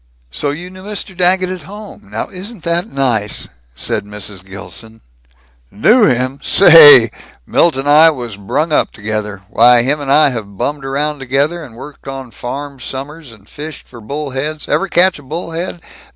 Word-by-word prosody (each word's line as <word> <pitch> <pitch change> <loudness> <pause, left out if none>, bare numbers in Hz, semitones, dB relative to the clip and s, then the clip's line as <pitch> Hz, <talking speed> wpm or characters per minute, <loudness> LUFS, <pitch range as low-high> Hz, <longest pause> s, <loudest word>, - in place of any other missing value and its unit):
"So 145 - -2
you 175 +5 -6
knew 185 0 -12
Mr. 205 -1 -6
Daggett 185 +1 +2
at 185 -1 -6
home? 200 - -12
Now 105 +2 -4
isn't 195 0 -9
that 170 +1 -1
nice," 120 -7 -1 0.3
said - - -2
Mrs. 105 -2 -8
Gilson. 100 +3 -9 0.7
"Knew 215 - +4
him? 130 +2 0
Saaaaay, 145 - +8 0.3
Milt 170 -4 +2
and 135 +2 -3
I 155 +3 +7
was 120 -8 -5
brung 125 +11 -2
up 150 - +1
together. 105 -2 -5
Why, 120 +3 +4
him 145 +4 -1
and 135 -1 -3
I 150 0 +5
have 105 -6 -7
bummed 145 +3 -3
around 145 +2 -2
together, 140 +6 -1
and 125 -6 -13
worked 140 +4 -12
on 135 -2 -7
farms, 135 +4 -7
summers, 145 +1 -7
and 105 -3 -18
fished 150 -1 -9
for 120 -2 -13
bull 140 +5 -5
heads 150 +4 -3
Ever 195 - 0
catch 185 -2 +2
a - - -13
bull 160 +5 -6
head? 170 +1 -5
140 Hz, 175 wpm, -15 LUFS, 115-165 Hz, 0.7 s, Saaaaay